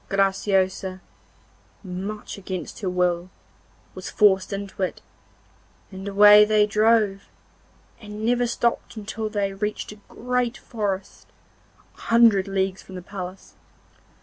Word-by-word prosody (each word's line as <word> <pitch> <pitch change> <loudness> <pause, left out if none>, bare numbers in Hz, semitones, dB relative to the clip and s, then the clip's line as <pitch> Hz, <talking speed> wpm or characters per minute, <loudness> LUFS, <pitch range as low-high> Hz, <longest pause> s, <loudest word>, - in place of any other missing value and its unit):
Graciosa, 195 -1 0 0.8
much 195 +3 -6
against 185 -2 -6
her 195 - -2
will, 180 0 0 0.6
was - - -7
forced 195 -3 +3
into 200 -1 -6
it, 185 - -2 0.9
and 190 +1 -8
away 205 +1 +8
they 210 0 +3
drove, 210 -2 +2 0.7
and 210 0 -7
never 245 +1 +2
stopped 235 0 -1
until 215 0 -5
they 200 -2 -1
reached 210 +2 -4
a 210 - -13
great 250 0 -2
forest, 200 -4 -5 0.7
a - - -18
hundred 230 -4 +4
leagues 190 -1 -1
from 190 - -12
the 180 - -7
palace. 185 -1 -8
200 Hz, 120 wpm, -24 LUFS, 190-215 Hz, 0.9 s, away